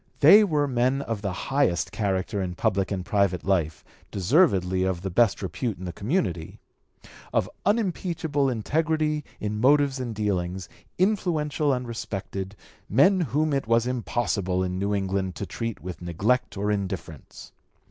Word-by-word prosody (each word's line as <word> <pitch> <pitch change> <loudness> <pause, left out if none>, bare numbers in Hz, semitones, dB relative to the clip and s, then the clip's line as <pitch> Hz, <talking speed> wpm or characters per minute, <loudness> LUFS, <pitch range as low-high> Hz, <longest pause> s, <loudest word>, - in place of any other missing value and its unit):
They 215 +2 +9
were 150 -7 +1
men 130 +2 +1
of 115 -5 -4
the 100 -2 -2
highest 135 -1 0
character 100 0 -1
in 90 -1 -3
public 100 -1 0
and 95 -3 -3
private 100 -4 +1
life, 85 -5 0 0.3
deservedly 95 - +2
of 95 -2 -1
the 95 - -3
best 110 +1 +2
repute 95 +4 -3
in 95 - -8
the 90 - -5
community, 95 - -2 0.7
of - - +1 0.2
unimpeachable 170 -9 0
integrity 150 +5 0 0.2
in 105 0 -3
motives 140 0 +4
and 120 -3 -4
dealings, 95 -3 -2 0.3
influential 160 -7 +1
and 125 -2 -2
respected, 100 -3 -5 0.3
men 165 - +5
whom 150 +1 0
it 135 -5 -1
was 115 0 +3
impossible 110 -7 -1
in 90 0 -2
New 100 +1 0
England 95 -1 -1
to 100 - -4
treat 115 -3 -5
with 90 +1 -7
neglect 105 +9 0
or 105 +1 0
indifference. 95 -7 -5
105 Hz, 145 wpm, -25 LUFS, 95-140 Hz, 0.7 s, They